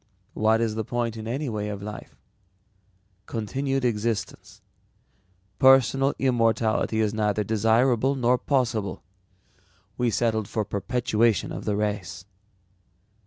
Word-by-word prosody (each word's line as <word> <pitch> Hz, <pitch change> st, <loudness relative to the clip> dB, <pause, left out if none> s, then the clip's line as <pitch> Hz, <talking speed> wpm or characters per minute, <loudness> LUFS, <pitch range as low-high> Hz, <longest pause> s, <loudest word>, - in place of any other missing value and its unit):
"What 110 Hz, +1 st, +2 dB
is 115 Hz, -2 st, 0 dB
the 110 Hz, +1 st, -2 dB
point 120 Hz, 0 st, -2 dB
in 110 Hz, 0 st, -7 dB
any 135 Hz, +5 st, -2 dB
way 105 Hz, -3 st, -3 dB
of 100 Hz, -1 st, -6 dB
life? 105 Hz, 0 st, -9 dB, 1.1 s
Continued 135 Hz, +4 st, -2 dB
existence. 115 Hz, -1 st, -3 dB, 1.0 s
Personal 135 Hz, +1 st, +5 dB
immortality 115 Hz, -3 st, +1 dB
is 110 Hz, -1 st, +1 dB
neither 105 Hz, -1 st, 0 dB
desirable 115 Hz, +5 st, +2 dB
nor 125 Hz, -1 st, +2 dB
possible. 115 Hz, -, -1 dB, 1.0 s
We 120 Hz, -1 st, +2 dB
settled 110 Hz, -2 st, 0 dB
for 110 Hz, 0 st, -2 dB
perpetuation 115 Hz, +2 st, 0 dB
of -, -, -6 dB
the 105 Hz, -, 0 dB
race." 100 Hz, -4 st, -3 dB
110 Hz, 115 wpm, -25 LUFS, 105-125 Hz, 1.1 s, Personal